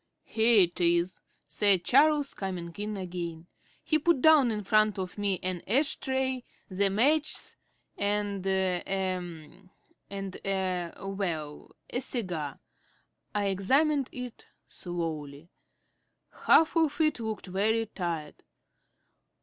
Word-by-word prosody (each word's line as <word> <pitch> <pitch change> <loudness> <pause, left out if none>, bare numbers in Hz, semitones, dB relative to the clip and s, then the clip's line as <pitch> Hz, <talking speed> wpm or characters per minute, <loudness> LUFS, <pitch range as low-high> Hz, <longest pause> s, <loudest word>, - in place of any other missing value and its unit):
"Here 225 -1 +4
it 175 -1 +1
is," 170 +1 +2 0.2
said 185 +4 +3
Charles, 290 - +4
coming 180 -3 -5
in 210 0 -3
again. 175 -3 -5 0.4
He 310 - +2
put 335 -1 +2
down 300 -3 +6
in 210 -2 -2
front 215 +1 +3
of 185 -1 -4
me 200 -3 0
an 185 -2 -2
ash 275 +9 +2
tray, 265 -1 -1 0.2
the 195 +1 +1
matches 295 +9 +1 0.4
and 205 -1 -1
a 190 -2 +1 1.3
and 195 -1 -6
a 185 -3 -1
well, 175 -7 -4
a 245 - -3
cigar. 175 - -3 0.8
I 205 -1 +1
examined 265 +9 +2
it 250 -2 -8 0.2
slowly. 165 -3 -6 1.0
Half 320 +1 +6
of 320 -2 +2
it 310 -5 +2
looked 220 -2 -4
very 215 +4 +1
tired. 170 -7 -5
200 Hz, 115 wpm, -29 LUFS, 180-245 Hz, 1.3 s, down